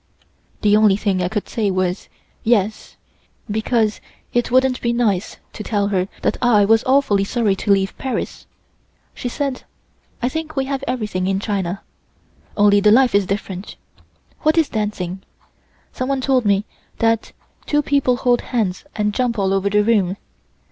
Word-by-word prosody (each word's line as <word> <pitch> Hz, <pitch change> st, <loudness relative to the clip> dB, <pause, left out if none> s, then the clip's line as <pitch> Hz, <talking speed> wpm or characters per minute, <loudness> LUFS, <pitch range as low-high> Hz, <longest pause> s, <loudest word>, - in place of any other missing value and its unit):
The 210 Hz, 0 st, +5 dB
only 210 Hz, -2 st, +5 dB
thing 200 Hz, -3 st, 0 dB
I 180 Hz, -, +1 dB
could 210 Hz, +1 st, -3 dB
say 215 Hz, -3 st, -1 dB
was 185 Hz, 0 st, -1 dB, 0.3 s
"Yes," 215 Hz, -2 st, 0 dB, 0.5 s
because 220 Hz, 0 st, 0 dB, 0.3 s
it 240 Hz, 0 st, +1 dB
wouldn't 255 Hz, 0 st, +2 dB
be 235 Hz, 0 st, 0 dB
nice 215 Hz, -6 st, 0 dB, 0.2 s
to -, -, -7 dB
tell 205 Hz, -2 st, 0 dB
her 185 Hz, -2 st, 0 dB, 0.2 s
that -, -, +1 dB
I 225 Hz, -5 st, +4 dB
was 225 Hz, +2 st, +4 dB
awfully 260 Hz, -7 st, +3 dB
sorry 210 Hz, -1 st, +1 dB
to 205 Hz, -, 0 dB
leave 195 Hz, 0 st, +2 dB
Paris. 260 Hz, -2 st, -4 dB, 0.7 s
She 245 Hz, -, -4 dB
said: 275 Hz, 0 st, -3 dB, 0.6 s
"I 245 Hz, -, 0 dB
think 310 Hz, +3 st, -4 dB
we 270 Hz, -1 st, 0 dB
have 275 Hz, 0 st, -3 dB
everything 210 Hz, -7 st, -2 dB
in 195 Hz, 0 st, 0 dB
China, 195 Hz, -3 st, -3 dB, 0.7 s
only 205 Hz, -1 st, +5 dB
the 210 Hz, +1 st, +4 dB
life 250 Hz, +2 st, +5 dB
is 200 Hz, -2 st, +3 dB
different. 195 Hz, -1 st, -4 dB, 0.7 s
What 310 Hz, +1 st, +2 dB
is 320 Hz, -3 st, +3 dB
dancing? 195 Hz, -4 st, -3 dB, 0.7 s
Someone 265 Hz, +1 st, -1 dB
told 255 Hz, -3 st, +2 dB
me 200 Hz, 0 st, +2 dB, 0.3 s
that 225 Hz, -1 st, +1 dB, 0.4 s
two 295 Hz, 0 st, +2 dB
people 275 Hz, -3 st, +2 dB
hold 245 Hz, -1 st, +2 dB
hands 215 Hz, -3 st, -2 dB
and 210 Hz, -1 st, 0 dB
jump 240 Hz, 0 st, 0 dB
all 195 Hz, -1 st, +1 dB
over 195 Hz, +1 st, +1 dB
the 210 Hz, +1 st, +3 dB
room. 200 Hz, -4 st, +1 dB
215 Hz, 160 wpm, -20 LUFS, 195-250 Hz, 0.7 s, The